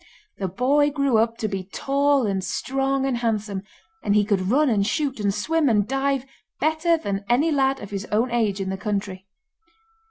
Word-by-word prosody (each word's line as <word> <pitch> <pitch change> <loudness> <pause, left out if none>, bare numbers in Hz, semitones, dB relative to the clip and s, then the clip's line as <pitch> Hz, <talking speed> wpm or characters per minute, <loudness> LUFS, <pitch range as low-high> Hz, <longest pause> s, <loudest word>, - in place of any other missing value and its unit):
The 195 - -1
boy 270 +10 +2
grew 275 -5 +2
up 230 +1 +1
to 220 - -2
be 195 -2 -3
tall 280 -1 +1
and 195 -2 -1
strong 270 +7 -1
and 265 -3 0
handsome, 215 -4 -2 0.4
and 205 -1 +1
he 210 -1 +4
could 195 -3 0
run 295 +6 +3
and 215 -5 +2
shoot, 270 +3 -1
and 200 -1 +1
swim 295 +8 +1
and 210 -2 +2
dive 270 0 0 0.3
better 315 +2 +2
than 200 -9 -3
any 285 +7 +3
lad 270 -2 +2
of 205 - -9
his 200 0 -4
own 230 +4 0
age 215 -4 0
in 190 -1 -2
the 190 - -3
country. 195 -2 -4
235 Hz, 190 wpm, -23 LUFS, 200-275 Hz, 0.4 s, he